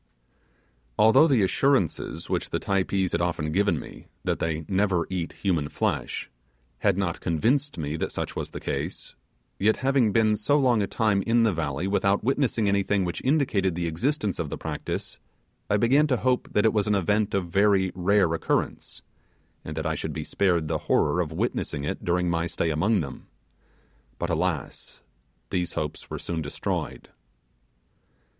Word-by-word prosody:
Although 130 +9 +6
the 130 -9 +3
assurances 130 - +1
which - - -2
the - - -1
Typees 95 -1 0
had 85 - 0
often 80 -3 -1
given 100 +5 +2
me, - - -11 0.2
that - - -1
they 80 -1 -2
never 95 -3 +1
eat 90 -3 -3
human 85 -7 +1
flesh, - - -2 0.5
had 100 -3 +2
not 95 -4 -1
convinced 125 - 0
me 75 0 -3
that - - -2
such - - -4
was - - -4
the - - -7
case, - - -4 0.5
yet, 110 +3 +3
having 135 -5 +3
been 110 0 +3
so 145 +8 +2
long 125 -6 +3
a 100 - 0
time 105 -3 +1
in 115 0 +4
the 110 -3 +3
valley 80 0 -2
without 100 0 +1
witnessing 125 -4 +1
anything 100 -1 +1
which 85 -1 -4
indicated 125 - +1
the 85 0 -2
existence 105 - -1
of 80 - -2
the - - -4
practice, - - -5 0.5
I 105 - +3
began 135 +7 +4
to 130 -4 +1
hope 125 +1 0
that 105 - +3
it 110 - +4
was 105 -1 +1
an 105 - +3
event 105 +2 +1
of 90 -3 -1
very 95 0 +3
rare 95 -1 +2
occurrence, 85 - -2 0.6
and 80 0 -7
that 80 - -2
I 80 - 0
should 80 0 -4
be 80 - -4
spared 85 -2 +1
the - - -1
horror - - +3
of - - -3
witnessing 70 - -2
it 75 - -4
during 90 -1 +1
my 85 0 0
stay 85 -1 -1
among 95 +6 +2
them: 70 -4 -8 0.9
but, - - -2
alas, - - -3 0.5
these 90 -1 -1
hopes 75 -1 -4
were - - -4
soon 85 -2 -3
destroyed. 70 -1 -4
100 Hz, 170 wpm, -26 LUFS, 85-110 Hz, 0.9 s, Although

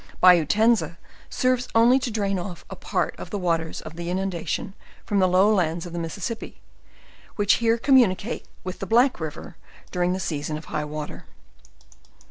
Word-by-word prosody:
Bayou 175 -4 +6
Tenza 220 -4 +2 0.3
serves 255 -1 +1
only 240 +3 +6
to 255 - -3
drain 200 -4 -1
off 175 -1 -7
a - - -5
part - - -2
of - - -7
the 205 - -3
waters 165 -3 -1
of 155 - -10
the 170 0 -4
inundation 190 +3 -2 0.3
from 205 - +1
the 185 - +4
low 190 +4 +4
lands 170 -3 0
of 175 - -8
the 170 - -3
Mis 165 +3 -5
sissippi, 225 +4 -5 0.8
which 205 -1 +3
here 230 0 +3
communicate 235 -4 +2 0.2
with 185 -1 -6
the 195 - -5
Black 245 +1 +3
river 160 +2 -7 0.3
dur 180 - -2
ing 175 +1 +2
the 185 - -2
season 150 -3 -3
of 155 - -10
high 150 - -3
water. 150 0 -7
185 Hz, 180 wpm, -24 LUFS, 170-225 Hz, 0.8 s, Bayou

